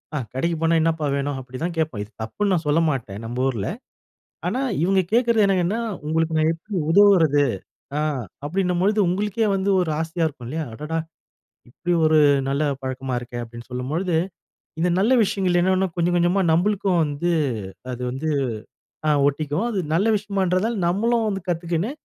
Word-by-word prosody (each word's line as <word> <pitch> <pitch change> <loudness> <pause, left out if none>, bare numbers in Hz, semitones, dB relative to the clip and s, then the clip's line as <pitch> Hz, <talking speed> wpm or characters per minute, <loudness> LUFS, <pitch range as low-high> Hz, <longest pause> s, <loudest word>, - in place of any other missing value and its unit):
ஆ - - 0 0.2
கடைக்குப் 165 +5 -1
போனா 165 0 +3
"என்னப்பா 160 -1 0
வேனும்?" 140 0 -2
அப்படி 130 0 -9
தான் 170 0 -1
கேட்போம். 155 -10 -1
இது 105 - -14
தப்புன்னு 200 - -1
நான் 170 - 0
சொல்லமாட்டேன் 145 -10 0
நம்ம 125 +3 -2
ஊர்ல, 110 -6 -2 0.8
ஆனா, 255 - -1 0.2
இவங்க 190 +2 +3
கேட்கிறது 235 -2 +4
என்னன்னா 195 +3 +1 0.3
"உங்களுக்கு 160 0 0
நான் 155 +1 +3
எப்படி 195 +6 -8 0.2
உதவுறது." 165 -7 +5 0.6
ஆ - - +1 0.4
அப்படின்னும் 180 +3 0
பொழுது 210 +2 +2
உங்களுக்கே 210 +4 0
வந்து 195 +1 0
ஒரு 175 -3 0
ஆசையா 165 +1 -1
இருக்கும் 130 -6 -7
இல்லையா, 160 +3 -3
அடடா! 150 +6 -3 0.7
இப்படி 175 +8 -2
ஒரு 155 0 +5 0.3
நல்ல 140 +2 0 0.2
பழக்கமா 130 -1 -3
இருக்கே! 120 0 -7
அப்படின்னு 120 +1 -11
சொல்லும்பொழுது, 155 +8 -1 0.7
இந்த 175 - +2
நல்ல 220 +7 +3
விஷயங்கள் 190 -3 +1
என்னனா 190 +1 +2
கொஞ்சம் 175 +1 +1
கொஞ்சமா 175 +3 +2
நம்மளுக்கும் 185 +1 +2
வந்து, 150 +4 -1 0.6
அது 125 0 -6
வந்து, 135 +5 -3 0.8
ஆ - - +3 0.2
ஒட்டிக்கும். 150 - -1
அது 205 - -2 0.2
நல்ல 195 +7 +2
விஷயமான்றதால 200 +1 0
நம்மளும் 225 +5 +1
வந்து 195 -2 -3
கத்துக்கின்னு, 170 +5 -1
170 Hz, 155 wpm, -23 LUFS, 145-195 Hz, 0.8 s, உதவுறது